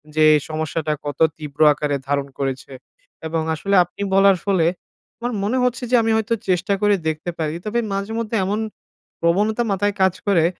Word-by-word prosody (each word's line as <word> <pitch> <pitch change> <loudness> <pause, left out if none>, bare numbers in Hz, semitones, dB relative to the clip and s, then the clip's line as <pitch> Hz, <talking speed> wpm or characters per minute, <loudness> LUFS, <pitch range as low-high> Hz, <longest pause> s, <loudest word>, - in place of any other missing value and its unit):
যে 155 0 +5 0.2
সমস্যাটা 155 0 -2
কত 145 -1 -5 0.2
তীব্র 150 -1 -9
আকারে 145 -1 -1
ধারণ 140 0 0
করেছে। 135 -1 -3 0.6
এবং 160 0 -1
আসলে 200 +5 0
আপনি 175 +3 -12
বলার 195 -1 +5
ফলে, 190 -5 +2 0.5
আমার 245 +1 -2
মনে 225 +6 0
হচ্ছে 250 0 0
যে - - +5
আমি 225 0 +1
হয়তো 220 +1 0 0.2
চেষ্টা 185 +2 +1
করে 205 -1 +4
দেখতে 155 +2 -2
পারি। 155 0 -1
তবে 230 +3 0
মাঝে 200 +2 -3
মধ্যে 230 0 -3
এমন 205 +3 -1 0.6
প্রবণতা 210 +7 +2
মাথায় 205 +1 +1
কাজ 190 -1 +4
করে 175 -5 +4
190 Hz, 170 wpm, -21 LUFS, 155-210 Hz, 0.6 s, যে